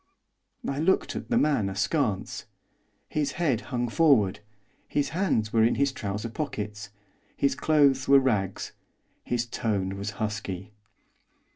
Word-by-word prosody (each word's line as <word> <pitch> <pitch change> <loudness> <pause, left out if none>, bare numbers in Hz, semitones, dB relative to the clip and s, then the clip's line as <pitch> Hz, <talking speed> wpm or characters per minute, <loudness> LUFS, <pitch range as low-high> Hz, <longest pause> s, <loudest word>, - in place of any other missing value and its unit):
I 140 +1 -2
looked 185 +5 +1
at - - -6
the 240 - +2
man 140 - +2
askance. 105 - -1 0.6
His 145 -2 -1
head 140 -10 0
hung 120 -2 -1
forward; 115 - +3 0.5
his 145 -1 0
hands 155 - 0
were 115 -1 +4
in 115 - +3
his 140 0 +2
trouser 105 -2 -4
pockets; 105 -6 -5 0.5
his 140 - +2
clothes 140 -2 +3
were 140 - +7
rags; 105 -8 0 0.5
his 120 0 0
tone 100 -5 -2
was 100 +2 -3
husky. 105 -2 -4
120 Hz, 130 wpm, -27 LUFS, 105-140 Hz, 0.6 s, were